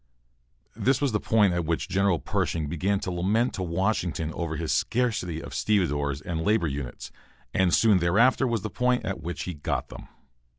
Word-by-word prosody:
This 130 0 +1
was 140 -3 +1
the 105 - +1
point 105 -5 +3
at 85 0 0
which 80 +1 -1
General 95 -2 +2
Pershing 80 0 -2
began 95 +6 0
to 95 - -3
lament 100 +8 +1
to - - -4
Washington 85 -3 -1
over 80 -1 -3
his 80 -1 -2
scarcity 110 -9 0
of - - -9
stevedores, 75 -9 0
and 85 -2 -3
labor 105 0 +2
units, 70 -4 -5 0.4
and 95 -1 +2
soon 105 0 +4
thereafter 115 +10 +3
was 115 -4 -1
the 110 - -4
point 125 0 +1
at 95 - -3
which 85 +2 -4
he 90 - -4
got 75 - -3
them. - - -10
90 Hz, 180 wpm, -26 LUFS, 80-110 Hz, 0.4 s, soon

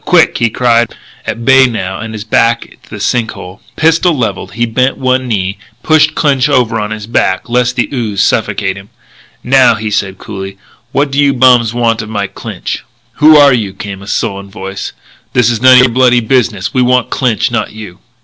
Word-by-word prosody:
Quick!" 170 -4 +3
he 120 -1 +2
cried, 120 0 +1 0.3
at 115 - -4
bay 135 0 +6
now, 95 -6 -4
and 110 0 -6
his 105 - -6
back 115 +1 +1 0.2
to - - -22
the 105 - -8
sink 115 +2 -1
hole. 90 +2 -11
Pistol 165 +1 +2
levelled, 110 -6 -3
he 120 +2 0
bent 125 +3 0
one 130 0 0
knee, 100 -4 -2 0.2
pushed 155 -1 +3
Clinch 140 -2 +1
over 125 -5 +1
on 105 0 -3
his 110 -1 -6
back, 105 -4 -1
lest 125 +1 0
the 125 - 0
ooze 110 -6 -3
suffocate 105 -3 -1
him. 100 +1 -12 0.5
"Now," 130 0 +4
he 110 0 -4
said 95 -2 -2
coolly, 95 -1 -8 0.3
"what 140 0 0
do 140 - -1
you 140 -2 +3
bums 125 -3 +4
want 115 -2 0
of 110 - -9
Mike 100 -2 -4
Clinch?" - - -6 0.3
"Who 155 +1 +6
are 145 -2 +6
you?" 105 -5 -2
came 100 -1 -7
a 100 - -12
sullen 100 -1 -3
voice. 95 -1 -7 0.4
"This 120 -1 +3
is 115 -1 -3
none 130 0 +7
o' - - +7
your 125 - +3
bloody 125 0 +3
business. 115 -4 -1
We 130 - +1
want 125 0 +1
Clinch, 120 -2 0
not 115 - -2
you." 105 -5 -11
115 Hz, 200 wpm, -12 LUFS, 105-130 Hz, 0.5 s, none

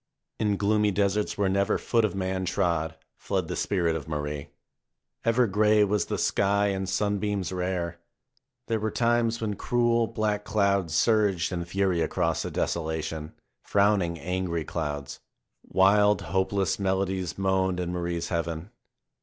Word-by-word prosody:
In 105 -2 +1
gloomy 105 +1 +2
deserts, 100 +1 0
where 100 -1 +2
never 100 +1 +2
foot 115 -2 +1
of 110 - 0
man 95 0 -2
trod, 85 -4 0 0.2
fled - - -2
the - - -3
spirit 85 -5 0
of 80 -2 -5
Marie. 75 -1 -4 0.8
Ever 115 +2 +3
gray 105 +1 +4
was 105 +1 +1
the - - -2
sky 100 +1 +2
and 95 -1 -2
sunbeams 100 -1 -1
rare. 90 -2 -2 0.7
There 115 -1 -1
were 110 +1 -1
times 115 0 +1
when 110 -2 -2
cruel, 120 +1 +1
black 105 -2 -1
clouds 100 -4 +1
surged 100 -4 +2
in 85 -2 -3
fury 95 -1 0
across - - 0
the - - -3
desolation, 80 -1 -3 0.3
frowning 100 -4 +2
angry 90 -2 -2
clouds. 75 -4 -4 0.5
Wild, 105 +2 +4
hopeless 95 +4 0
melodies 95 -3 -1
moaned 95 -1 +1
in 90 -1 -2
Marie's 85 -1 -3
heaven. 85 +2 -3
95 Hz, 140 wpm, -27 LUFS, 85-105 Hz, 0.8 s, gray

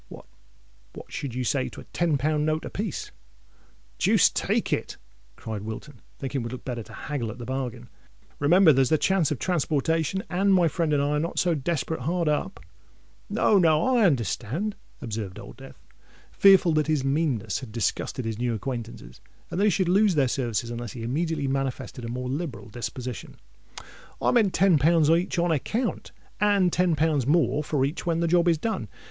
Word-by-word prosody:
"What—what 60 -1 -16
should 130 -4 -5
you 125 - -1
say 130 +2 0
to - - -11
a - - -9
ten 165 -4 +1
pound 150 +2 0
note 155 +1 -1
a - - -6
piece?" 205 -5 -4 0.9
"Deuce - - +4
take - - 0
it!" - - -3 0.4
cried 110 - -6
Wilton, 110 +5 -8 0.2
thinking 135 -1 -3
it - - -5
would 115 - -5
look 130 - -8
better 120 -3 -4
to - - -12
haggle 140 -7 -4
at 110 - -7
the 120 - -7
bargain: 125 -2 -4 0.5
"remember, 165 +3 +6
there's 135 -1 +3
the 155 - +4
chance 190 -2 +2
of 150 - -2
transportation—and 175 - 0
my 175 -2 +4
friend 165 0 -1
and 145 -1 +2
I 145 - 0
are 150 0 +1
not 165 +3 -3
so 175 -2 +2
desperate 160 0 -2
hard 170 +5 -1
up——" 145 -11 -1 0.7
"No—no—I 205 +2 +3
understand," 140 - 0 0.3
observed 105 -6 -5
Old - - -11
Death, - - -14 0.5
fearful 195 -4 +5
that 155 -1 +1
his 155 -4 +1
meanness 140 -6 0
had 130 -5 -9
disgusted 115 +2 -2
his 110 -1 -3
new 120 -1 0
acquaintances 115 0 -6 0.3
and 175 - -2
that 205 - +3
he - - +5
should 190 -2 +1
lose 195 +1 +3
their 140 -3 +3
services 120 -2 -2
unless 120 -1 -6
he 115 - -7
immediately 150 +3 -1
manifested 135 -2 -3
a - - -5
more 125 +1 -4
liberal 130 -6 -4
disposition: 120 +2 -6 0.8
"I - - +2
meant 220 -6 +3
ten 185 -5 +4
pounds 160 +1 +4
each 170 +2 +1
on 170 0 +2
account, 215 - -2 0.3
and 200 -4 +3
ten 180 -2 +2
pounds 150 -4 +1
more 150 -2 +2
for 145 -3 0
each 145 +5 -4
when 165 -1 +1
the 170 - +1
job 175 +1 +3
is 165 -2 +4
done. 190 - -3
150 Hz, 185 wpm, -26 LUFS, 125-170 Hz, 0.9 s, remember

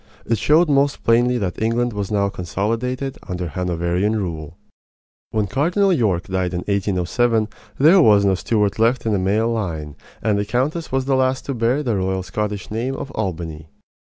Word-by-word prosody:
It 115 -2 0
showed 160 +8 +4
most 140 -1 +1
plainly 120 +2 +3
that 95 -5 -3
England 115 +2 +1
was 100 -2 -3
now 100 -2 +1
consolidated 115 - -3
under 90 -2 -3
Hanoverian 90 +4 -1
rule. 85 -5 -4 0.7
When 110 -2 0
Cardinal 175 - +2
York 100 - +1
died, 95 -1 -2
in 90 - -2
1807, 100 +4 0 0.3
there 165 +7 +6
was 105 -7 +5
no 95 - +3
Stuart 105 +2 0
left 115 +2 +2
in 110 - +1
the 100 - +1
male 105 +5 +1
line; 80 -10 -3 0.2
and 105 -2 +1
the 105 - -1
countess 135 +9 -1
was 130 0 0
the 135 0 +2
last 130 0 +1
to 140 - -2
bear 120 +5 +1
the 120 -6 0
royal 95 0 -1
Scottish 105 0 -4
name 120 +5 -2
of 135 - -6
Albany. 80 - -4
110 Hz, 175 wpm, -21 LUFS, 95-125 Hz, 0.7 s, there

